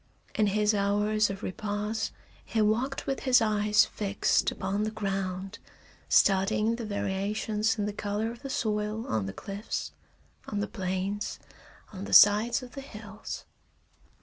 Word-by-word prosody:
In 215 -2 +2
his 210 +1 +2
hours 205 +1 +2
of 195 0 -6
repose 210 +3 -2 0.3
he 225 - -2
walked 225 +6 +1
with 270 - -1
his 255 -2 +5
eyes 210 -1 +3
fixed 200 -1 +1
upon 195 +2 -2
the 215 - 0
ground, 195 -2 -3 0.5
studying 210 +3 +3
the 235 - -5
variations 210 +2 -1
in 205 - 0
the 210 - -3
color 210 +2 -2
of 235 - -11
the 275 - -6
soil 215 -1 -1
on 105 -3 -1
the - - -3
cliffs, 200 - -5 0.6
on 205 - -2
the 205 - 0
plains, 190 +1 -3 0.6
on 195 0 -6
the - - -5
sides 215 +5 +7
of 250 - -10
the 275 - -7
hills. 215 -5 -8
210 Hz, 150 wpm, -29 LUFS, 200-220 Hz, 0.6 s, sides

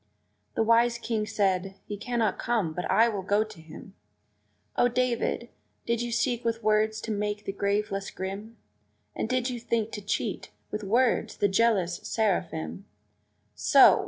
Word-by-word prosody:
The - - +2
wise 230 +1 +4
King 225 -2 -2
said, 195 -2 0
"He 205 - -5
cannot 220 -1 -1
come 215 -9 0
but 180 +2 -4
I 230 +1 +5
will 205 -4 -2
go 205 +3 +2
to 215 -7 -12
him!" 160 +4 -12 0.8
O 245 - +4
David! 245 -1 0 0.4
did 235 0 0
you 240 0 -3
seek 235 +1 0
with 230 -1 -1
words 215 0 +2
to 225 - -4
make 210 0 -2
the - - -2
grave 200 +2 0
less 195 0 -3
grim? 200 +4 -6 0.6
And 220 - -2
did 255 0 0
you 245 - -4
think 225 -2 -1
to 210 - -5
cheat, 200 - -2 0.2
with 210 0 -3
words, 235 +5 +2
the 205 - +3
jealous 195 -4 +2
seraphim? 175 - -1 0.7
So! - - +6
215 Hz, 160 wpm, -28 LUFS, 195-235 Hz, 0.8 s, So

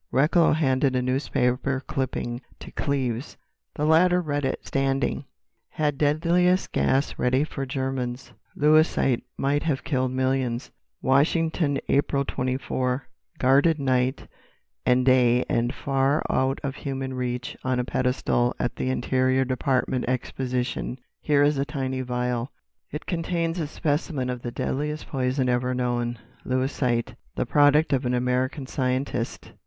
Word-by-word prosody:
Recklow 150 +7 +4
handed 135 -3 +2
a 125 - +2
newspaper 130 0 0
clipping 125 -2 -3 0.2
to - - -10
Cleves: 130 -2 -2 0.4
the 150 - -1
latter 175 +3 +5
read 145 -4 -1
it, - - -3
standing: 135 -1 0 0.4
"Had 150 -3 -1
Deadliest 170 +5 +2
Gas 135 +2 +1
Ready 130 +3 +2
for 135 -3 -4
Germans 130 -2 -3 0.2
"'Lewisite' 150 -4 +3 0.2
Might 145 +2 +1
Have 145 -4 -1
Killed 130 -3 0
Millions 130 -1 -1 0.3
"Washington, 150 +2 +2
April 140 0 +1
24.—Guarded 130 +3 0
night 130 -1 0 0.6
and 125 0 +4
day 125 -1 +4
and 120 +1 +1
far 135 +2 +1
out 130 +1 +1
of 140 0 -3
human 135 -1 -4
reach 125 -1 -3
on 130 -1 0
a - - +1
pedestal 125 -1 0
at 120 - -2
the 130 - -1
Interior 130 0 +1
Department 130 0 0
Exposition 125 0 -2 0.2
here 145 -1 +3
is 145 -1 +2
a - - +2
tiny 135 -3 -3
vial. 125 0 -2 0.4
It 150 - -6
contains 170 0 -1
a 155 - -1
specimen 145 -4 -1
of 125 -1 -5
the 120 - -4
deadliest 150 +5 -3
poison 130 -1 0
ever 125 +1 +1
known, 120 -1 -1 0.3
'Lewisite,' 130 -2 0 0.2
the - - 0
product 145 +1 +4
of 135 0 +1
an 125 - +1
American 125 +3 0
scientist. 130 -2 -2
130 Hz, 130 wpm, -25 LUFS, 125-145 Hz, 0.6 s, latter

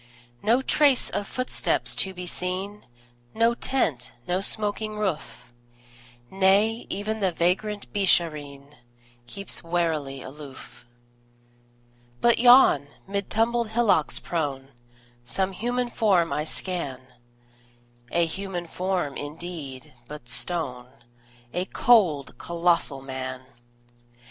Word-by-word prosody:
No 240 +4 +3
trace 280 -2 +3
of 205 - -2
footsteps 255 0 -1
to 190 - +1
be 180 -1 -7
seen, 185 +3 -4 0.5
No 230 +1 +4
tent, 165 - -1
no 180 +2 0
smoking 215 +1 -1
roof; 180 - -4 0.8
Nay, 200 +4 +3
even 215 +3 -3
the 190 -3 +1
vagrant 190 +5 0
Beeshareen 150 -7 +1 0.5
Keeps 200 +8 -4
warily 160 -6 -1
aloof. 135 -2 -11 1.3
But 235 - +4
yon, 245 - +7 0.2
mid 200 0 -3
tumbled 235 +1 +1
hillocks 220 -9 +3
prone, 140 -5 -3 0.5
Some 190 +11 0
human 245 +5 -1
form 185 -6 +2
I 150 - -1
scan 160 -6 -3 1.1
A 170 0 +3
human 180 +1 -4
form, 180 -4 -2
indeed, 145 -4 -7
but 150 -5 -9
stone: 125 -1 -2 0.7
A 180 +1 -1
cold, 175 - +3
colossal 170 -5 0
Man! 130 -1 -5
180 Hz, 100 wpm, -26 LUFS, 150-210 Hz, 1.3 s, yon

